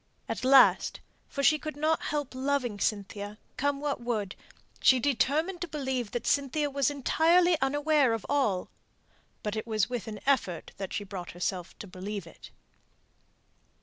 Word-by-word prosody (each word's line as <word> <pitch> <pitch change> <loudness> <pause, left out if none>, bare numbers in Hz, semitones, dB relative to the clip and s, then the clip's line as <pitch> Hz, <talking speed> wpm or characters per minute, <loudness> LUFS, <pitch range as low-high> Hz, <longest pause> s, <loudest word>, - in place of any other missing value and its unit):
At - - -4
last 265 0 +5 0.3
for 280 - -3
she 305 +1 +5
could 305 -1 -6
not 310 +2 +1
help 290 -3 -3
loving 260 -5 -1
Cynthia, 205 0 -2 0.2
come 285 +1 0
what 285 -3 -2
would 215 -5 -2 0.4
she 260 - +5
determined 285 +8 +1
to 350 - -2
believe 265 -6 -2
that 240 +1 -4
Cynthia 285 +1 +1
was 280 -1 +2
entirely 330 +5 +3
unaware 290 -1 +3
of 225 - -3
all; 220 -11 0 0.7
but 210 0 -2
it 220 - -4
was 220 +1 0
with 245 -3 -3
an 215 -1 -6
effort 250 -11 0
that 195 -2 -5
she 205 - -2
brought 190 -3 -7
herself 180 0 -3
to - - -8
believe 195 +2 -6
it. - - -13
260 Hz, 155 wpm, -29 LUFS, 210-290 Hz, 0.7 s, last